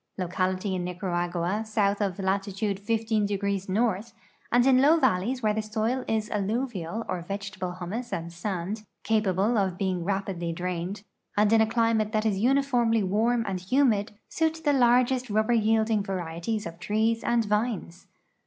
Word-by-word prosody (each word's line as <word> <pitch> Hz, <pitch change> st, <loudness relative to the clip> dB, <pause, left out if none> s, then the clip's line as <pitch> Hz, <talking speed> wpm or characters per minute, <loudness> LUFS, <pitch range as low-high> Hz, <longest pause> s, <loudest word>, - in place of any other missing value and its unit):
Localities 185 Hz, +2 st, -1 dB
in 180 Hz, -1 st, -2 dB
Nicaragua 175 Hz, +1 st, -2 dB
south 210 Hz, -2 st, 0 dB
of 195 Hz, -3 st, -1 dB
latitude 195 Hz, +1 st, -1 dB
lo° 205 Hz, -3 st, 0 dB
north, 215 Hz, +1 st, 0 dB, 0.4 s
and 245 Hz, +1 st, +4 dB
in 260 Hz, -1 st, +5 dB
low 305 Hz, +4 st, +6 dB
valleys 240 Hz, -, +1 dB
where 215 Hz, -1 st, +3 dB
the 220 Hz, -, -1 dB
soil 220 Hz, +4 st, -1 dB
is 220 Hz, -1 st, 0 dB
alluvial 215 Hz, -1 st, -2 dB
or 180 Hz, -, -3 dB
vegetable 190 Hz, 0 st, -5 dB
humus 190 Hz, +7 st, -5 dB
and 170 Hz, 0 st, -4 dB
sand, 190 Hz, +3 st, -3 dB, 0.2 s
cajiable 215 Hz, +1 st, +2 dB
of 190 Hz, -3 st, 0 dB
being 185 Hz, -3 st, -1 dB
raj)idly 190 Hz, -3 st, -2 dB
drained, 180 Hz, +3 st, -4 dB, 0.3 s
and 210 Hz, +1 st, +4 dB
in 225 Hz, -, +6 dB
a 220 Hz, -, +3 dB
climate 225 Hz, -1 st, +1 dB
that 215 Hz, 0 st, +1 dB
is 200 Hz, -3 st, +1 dB
uniformly 245 Hz, -3 st, +2 dB
warm 225 Hz, +5 st, +1 dB
and 190 Hz, -2 st, -2 dB
humid, 210 Hz, 0 st, +2 dB
suit 320 Hz, 0 st, -1 dB
the 290 Hz, -, +4 dB
largest 250 Hz, 0 st, +3 dB
rubber 215 Hz, +3 st, +2 dB
yielding 220 Hz, -1 st, +2 dB
varieties 185 Hz, +2 st, -3 dB
of 170 Hz, 0 st, -8 dB
trees 220 Hz, +3 st, 0 dB
and 235 Hz, -1 st, +2 dB
vines. 210 Hz, -4 st, -2 dB
210 Hz, 155 wpm, -27 LUFS, 185-230 Hz, 0.4 s, low